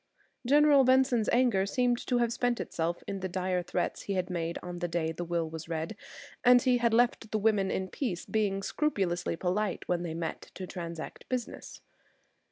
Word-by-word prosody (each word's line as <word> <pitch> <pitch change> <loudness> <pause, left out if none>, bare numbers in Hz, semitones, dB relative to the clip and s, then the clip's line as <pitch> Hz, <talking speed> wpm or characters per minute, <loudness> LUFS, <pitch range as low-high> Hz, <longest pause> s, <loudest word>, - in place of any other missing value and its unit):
General 290 0 +6
Benson's 255 -3 +3
anger 235 -6 +3
seemed 245 +3 +1
to 250 - +2
have 235 -1 +1
spent 245 0 0
itself 170 +1 -2
in 195 - -4
the 190 0 -3
dire 185 0 -1
threats 175 - -2
he 200 - -3
had 185 -1 -1
made 170 -1 -2
on 175 -1 -6
the 175 - -1
day 165 -1 -1
the 165 +2 -5
will 170 -1 -1
was 160 +1 -8
read; 165 +6 -3 0.7
he 250 -2 +3
had 235 -1 +2
left 230 -1 +2
the 215 - 0
women 210 -2 +2
in 190 0 -1
peace, 185 -4 -3
being 200 -3 0
scrupulously 190 - -1
polite 185 +3 -1
when 175 -1 0
they 165 -2 -4
met 165 -1 -5
to 185 - -5
transact 170 -3 -7
business. 250 -3 -5
195 Hz, 180 wpm, -30 LUFS, 175-240 Hz, 0.7 s, General